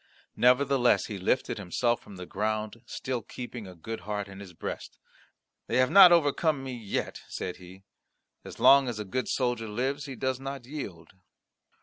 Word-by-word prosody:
Nevertheless 125 -4 +4
he 105 -3 -6
lifted 105 +5 0
himself 115 +5 0
from 100 - -13
the 90 -1 -7
ground, 110 +3 -3
still 130 -2 -3
keeping 120 -2 -8
a 90 - -11
good 110 +7 -6
heart 105 -1 -4
in 95 0 -11
his 100 -2 -10
breast. 85 - -7 0.7
"They - - 0
have 130 0 +3
not 190 -3 +10
overcome 155 -3 +3
me 130 -1 -5
yet"; 110 -5 -4
said 90 - -5
he, 95 +1 -14 0.6
"as - - -10
long 140 -1 +7
as 120 -3 -3
a 105 - -4
good 125 +6 -2
soldier 120 -3 0
lives, 130 +6 -2
he 135 -2 -7
does 130 +1 -1
not 135 -2 -6
yield." 100 - -7
120 Hz, 170 wpm, -28 LUFS, 100-135 Hz, 0.7 s, not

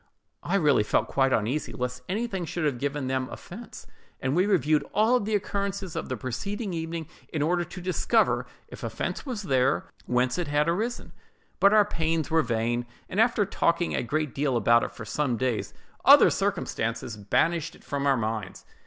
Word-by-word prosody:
I 185 - -1
really 150 - +4
felt 105 - +1
quite 135 -1 +2
uneasy 130 +6 0
lest 125 0 -4
anything 200 -2 -2
should 165 0 -3
have 135 -5 0
given 140 0 -2
them 130 0 -1
offence; 225 +7 -10 0.3
and 135 +2 -1
we 185 +3 +3
reviewed 155 -6 +3
all 225 +4 +4
the 210 0 -1
occurrences 200 -2 -2
of - - -4
the 130 - -2
preceding 195 - -4
evening 165 -1 -4 0.2
in 150 -2 0
order 175 +3 +1
to 180 +2 -9
discover, 185 0 +1 0.2
if - - -11
offence - - -3 0.2
there 135 -3 +3
was, - - -7 0.2
whence 125 +3 +1
it 175 - -1
had 145 +1 +1
arisen. 220 +8 -2 0.5
But 200 - +6
our 210 -1 +6
pains 165 -4 -1
were 160 0 +4
vain; 120 -1 -1 0.2
and 195 +4 +2
after 225 -3 +3
talking 170 -3 +1
a - - 0
great 150 +3 -2
deal 135 -3 0
about 120 +1 +4
it - - -3
for 110 - -9
some 130 +1 -1
days, 120 -1 -1 0.3
other - - +8
circumstances 115 0 -2
banished 160 +11 0
it - - -19
from 140 0 -2
our 135 -1 +4
minds. 110 -4 -4
150 Hz, 180 wpm, -27 LUFS, 125-185 Hz, 0.5 s, other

